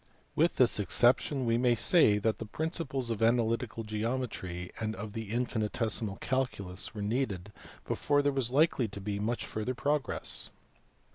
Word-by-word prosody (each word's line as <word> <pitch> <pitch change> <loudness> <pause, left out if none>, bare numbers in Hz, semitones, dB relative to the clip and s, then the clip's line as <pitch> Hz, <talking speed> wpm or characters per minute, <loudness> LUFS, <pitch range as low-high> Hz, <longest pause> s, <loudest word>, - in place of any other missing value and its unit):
With 165 +3 +2
this 125 -4 +4
exception 125 - +3
we 115 0 +2
may 125 -1 +3
say 115 - +5
that 110 +1 0
the 115 - -5
principles 140 - -3
of 115 - -3
analytical 115 0 +1
geometry 105 -5 -3
and 110 -1 -2
of 105 +1 -7
the 110 -2 -5
infinitesimal 110 -3 -1
calculus 105 -7 -1
were 105 - -4
needed 105 -4 -2 0.3
before 145 0 +1
there 145 - +2
was 135 -4 0
likely 140 -2 +2
to 100 -1 -9
be 100 0 -3
much 115 +3 -2
further 110 +4 -3
progress. 145 +3 0
115 Hz, 150 wpm, -30 LUFS, 105-130 Hz, 0.3 s, say